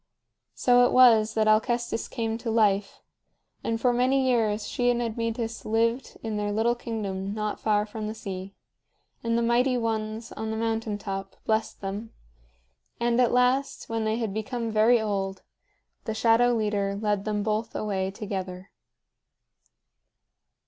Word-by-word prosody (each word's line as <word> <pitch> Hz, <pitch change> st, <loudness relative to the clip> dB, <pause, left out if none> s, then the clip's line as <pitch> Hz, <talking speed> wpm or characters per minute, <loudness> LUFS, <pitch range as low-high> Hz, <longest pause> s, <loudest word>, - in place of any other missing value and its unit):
So 245 Hz, 0 st, +5 dB
it -, -, -2 dB
was 225 Hz, -4 st, +6 dB
that 220 Hz, -1 st, +2 dB
Alcestis 235 Hz, +2 st, +1 dB
came 225 Hz, -2 st, -2 dB
to 235 Hz, -, -4 dB
life; 210 Hz, -3 st, +1 dB, 0.6 s
and 225 Hz, 0 st, -1 dB
for 245 Hz, +1 st, +2 dB
many 260 Hz, +2 st, +2 dB
years 215 Hz, -4 st, +1 dB
she 245 Hz, 0 st, 0 dB
and 240 Hz, -1 st, +2 dB
Admetus 230 Hz, 0 st, -3 dB
lived 230 Hz, +3 st, 0 dB
in 220 Hz, -2 st, -3 dB
their 205 Hz, 0 st, -1 dB
little 225 Hz, +3 st, +2 dB
kingdom 205 Hz, -4 st, -4 dB
not 210 Hz, -1 st, -3 dB
far 210 Hz, -1 st, +1 dB
from 215 Hz, 0 st, -6 dB
the 215 Hz, -, -5 dB
sea; 195 Hz, -2 st, -7 dB, 0.7 s
and 230 Hz, 0 st, +1 dB
the 235 Hz, -, +1 dB
Mighty 245 Hz, +2 st, +2 dB
Ones 225 Hz, -1 st, -3 dB
on 220 Hz, 0 st, -5 dB
the 220 Hz, -, -2 dB
mountain 225 Hz, -1 st, -1 dB
top 195 Hz, -1 st, -5 dB
blessed 220 Hz, 0 st, -1 dB
them; 205 Hz, +3 st, -5 dB, 0.9 s
and, 240 Hz, +1 st, +2 dB
at 245 Hz, -, +3 dB
last, 250 Hz, +2 st, +1 dB
when 225 Hz, -1 st, -1 dB
they 220 Hz, 0 st, 0 dB
had 225 Hz, -4 st, -2 dB
become 230 Hz, +2 st, -3 dB
very 220 Hz, +3 st, +4 dB
old, 195 Hz, -3 st, -2 dB, 0.6 s
the 220 Hz, -, -3 dB
Shadow 230 Hz, +2 st, +4 dB
Leader 205 Hz, -3 st, 0 dB
led 210 Hz, -2 st, 0 dB
them 210 Hz, -1 st, -1 dB
both 215 Hz, +1 st, -2 dB
away 190 Hz, -3 st, -1 dB
together. 190 Hz, -2 st, -6 dB
220 Hz, 150 wpm, -26 LUFS, 210-235 Hz, 0.9 s, was